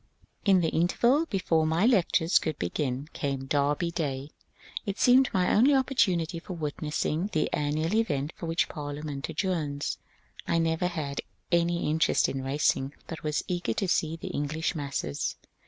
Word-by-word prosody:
In 190 -3 +5
the 160 - +1
interval 240 - +2
before 165 - +1
my 165 +6 +2
lectures 180 -7 +4
could 155 -2 -3
begin 130 - -2
came 135 -2 -3
Derby 145 +4 +1
Day. 145 -4 -3 0.5
It 200 -1 -4
seemed 255 +1 +5
my 180 -1 +2
only 265 +6 +5
opportunity 185 - +1
for 180 - -7
witnessing 155 +2 -2
the 155 - 0
an 145 0 0
nual 160 +4 0
event 155 -10 0
for 170 - -6
which 165 +1 +1
Parliament 145 -1 -5
adjourns. 155 -4 -2 0.5
I - - +2
never 165 +1 +1
had 150 -5 -3 0.3
any 170 0 +2
interest 160 +2 +3
in 135 -1 -3
racing, 135 0 0
but 165 - -7
was 150 -1 -1
eager 175 -10 -1
to 195 - -1
see 160 -2 +1
the 165 - -7
English 150 +3 -2
masses. 140 - -3
160 Hz, 155 wpm, -28 LUFS, 145-180 Hz, 0.5 s, In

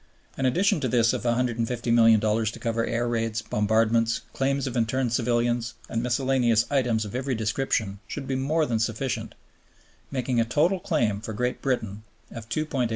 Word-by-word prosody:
An 135 - 0
addition 190 - +2
to 135 - -1
this 115 -1 +3
of - - -2
$150,000,000, 115 -2 +2
to - - -11
cover 115 -1 -1
air 120 +1 -1
raids, 115 -1 -1
bombardments, 110 +2 +1
claims 135 0 0
of 130 -2 -4
interned 120 +1 0
civilians, 120 0 0
and 115 - -1
miscellaneous 125 -2 +2
items 120 -6 +1
of 105 - -8
every 130 +1 -1
description, 110 -2 -1
should - - -5
be 135 - -3
more 150 +5 +1
than 115 -5 -1
sufficient, 115 +3 -2 0.7
making 130 -2 -1
a - - +4
total 155 +11 +1
claim 115 - 0
for 110 0 -6
Great 125 +3 -2
Britain 110 -6 -2 0.3
of 115 -1 -9
$2,850,000,000. 140 -6 -1
120 Hz, 160 wpm, -26 LUFS, 115-130 Hz, 0.7 s, a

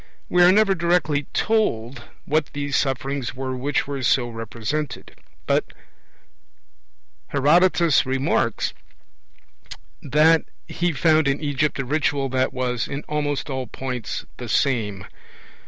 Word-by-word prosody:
We 180 - +3
are 175 +1 +8
never 200 0 +4
directly 170 -5 +1
told 130 - 0 0.2
what 155 0 +1
these 145 -1 -2
'sufferings' 135 -1 -1
were 130 0 -4
which 135 +3 -1
were 140 -1 -4
so 120 0 +2
represented; 115 +5 -5 0.3
but - - +2 1.6
Herodotus 170 +2 +4
remarks 130 +1 0 1.3
that 155 +3 +4 0.2
he 175 0 -1
found 155 0 +3
in 140 +1 +1
Egypt 145 0 -1
a 135 - -2
ritual 140 -1 0
that 130 0 0
was 125 -2 -2
'in 140 +2 -5
almost 145 -2 -2
all 130 -3 -4
points 125 0 -5
the - - -7
same'. 105 -8 0
140 Hz, 120 wpm, -23 LUFS, 130-155 Hz, 1.6 s, are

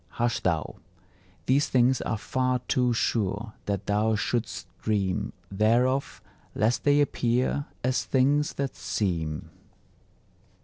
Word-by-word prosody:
Hush 120 0 +1
thou! 80 -4 -1 0.7
These 140 +3 +2
things 130 0 +3
are 110 - -1
far 130 +3 0
too 125 -1 +2
sure 110 -2 -1
that 100 -1 -2
thou 105 +2 +2
should'st 115 +2 -2 0.2
dream 100 -4 0 0.2
Thereof, 120 +7 +1 0.3
lest 110 +3 +1
they 145 0 +5
appear 130 +1 0 0.2
as 130 +1 +1
things 140 +3 +2
that 140 -1 -3
seem. 85 -3 -2
115 Hz, 115 wpm, -27 LUFS, 105-130 Hz, 0.7 s, they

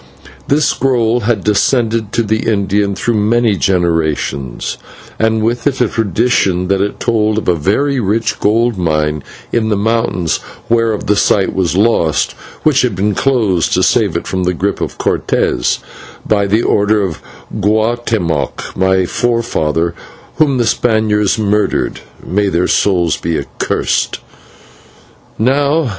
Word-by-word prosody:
This 150 +2 +2
scroll 120 -3 +1
had 115 -3 -1
descended 110 0 +1
to 115 - +1
the 110 +1 -1
Indian 100 -1 0
through 120 - -1
many 110 +1 +2
generations, 80 -8 -1 0.4
and 110 0 +1
with 120 +5 0
it 135 -2 -1
a 125 - +3
tradition 100 -4 0
that 100 -1 +2
it 100 - -2
told 110 -2 +1
of 110 - -3
a 90 - +4
very 110 - 0
rich 110 +1 -1
gold 115 0 +1
mine 75 -3 0 0.3
in 110 -2 0
the 105 - +1
mountains 110 -5 0 0.3
whereof 115 -2 +1
the 105 - +2
site 100 -1 +2
was 90 -2 0
lost, 100 -7 +2 0.3
which 150 -3 +3
had 125 -6 0
been 100 +3 0
closed 110 -10 +1
to - - +2
save - - +2
it - - -5
from 95 - -2
the 90 0 0
grip 100 +4 -2
of - - -4
Cortes, - - 0 0.5
by 100 -2 +1
the 110 +4 +1
order 105 0 +2
of 85 -6 -4 0.4
Guatemoc, 110 -7 -1
my 95 0 +2
forefather, 85 -8 0 0.4
whom 145 -4 +3
the 120 - +1
Spaniards 110 -3 +1
murdered 105 -1 0 0.3
may 100 +3 0
their 85 0 +1
souls 90 -5 +1
be 85 -1 -2
accursed! - - -2
105 Hz, 140 wpm, -14 LUFS, 95-115 Hz, 0.5 s, a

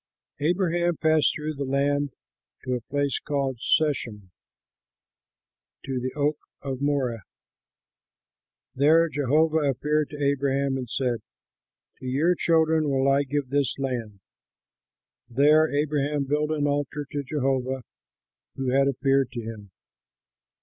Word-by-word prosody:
Abraham 175 +1 +1
passed 155 -1 +3
through 155 0 -3
the 140 -1 -4
land 140 +1 0 0.5
to 130 - -2
a 125 - -2
place 140 +2 -1
called 135 -4 -2
Shechem, 115 - 0 1.5
to 135 -2 -2
the 130 +1 -3
oak 150 +1 0 0.2
of 135 -1 -4
Moreh. 135 -6 0 1.5
There 160 +5 +4
Jehovah 155 +3 +2
appeared 150 +1 0
to 150 - -8
Abraham 140 -1 +1
and 130 -3 -4
said, 125 -2 -1 0.8
"To 130 - -7
your 150 +8 +2
children 160 -3 +2
will 135 0 +1
I 140 +1 +4
give 140 -1 -2
this 140 -1 0
land." 120 -7 -4 1.1
There 150 +5 +4
Abraham 145 0 0
built 150 +2 0
an 150 -2 0
altar 145 0 -1
to 145 - -2
Jehovah 130 -2 -1 0.7
who 135 -1 -2
had 135 +1 +3
appeared 135 -1 +1
to 120 - -4
him. 110 -3 -8
140 Hz, 120 wpm, -25 LUFS, 130-150 Hz, 1.5 s, There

